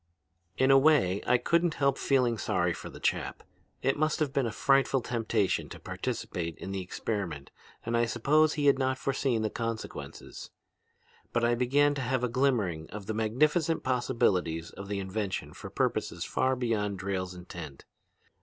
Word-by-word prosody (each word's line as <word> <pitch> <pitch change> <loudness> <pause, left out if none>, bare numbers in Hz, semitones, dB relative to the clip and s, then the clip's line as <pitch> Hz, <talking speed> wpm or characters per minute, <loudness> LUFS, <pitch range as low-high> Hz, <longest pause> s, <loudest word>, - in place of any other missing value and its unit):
"In 130 +1 +4
a 135 - +8
way 135 -11 +4
I 125 - +5
couldn't 170 +4 +1
help 140 -1 +2
feeling 125 -5 +1
sorry 90 -2 +1
for - - -8
the - - -11
chap. - - -1 0.4
It 135 +2 +1
must 155 0 +1
have 145 -3 0
been 135 -4 +1
a - - -3
frightful 135 +3 +3
temptation 115 -4 0
to - - -9
participate 85 -2 -4
in 95 - -6
the 95 -1 -2
experiment 90 -6 -4 0.3
and 115 +1 -1
I 120 0 +3
suppose 150 +7 +3
he 145 -1 -1
had 140 -1 +5
not 130 0 +1
forseen 130 -4 0
the 110 - -1
consequences. 115 -1 -6 0.8
But 120 - 0
I 120 0 +3
began 140 +4 +3
to 140 - -3
have 130 0 0
a 125 - +1
glimmering 115 - 0
of 105 -1 -7
the 110 - -3
magnificent 150 +10 +1
possibilities 95 -10 0
of 100 - -9
the 100 0 -2
invention 95 0 -3
for - - -9
purposes - - -1
far 130 0 +1
beyond 110 -5 -1
Drayle's 95 -1 -3
intent. 85 -5 -9
120 Hz, 170 wpm, -29 LUFS, 100-135 Hz, 0.8 s, a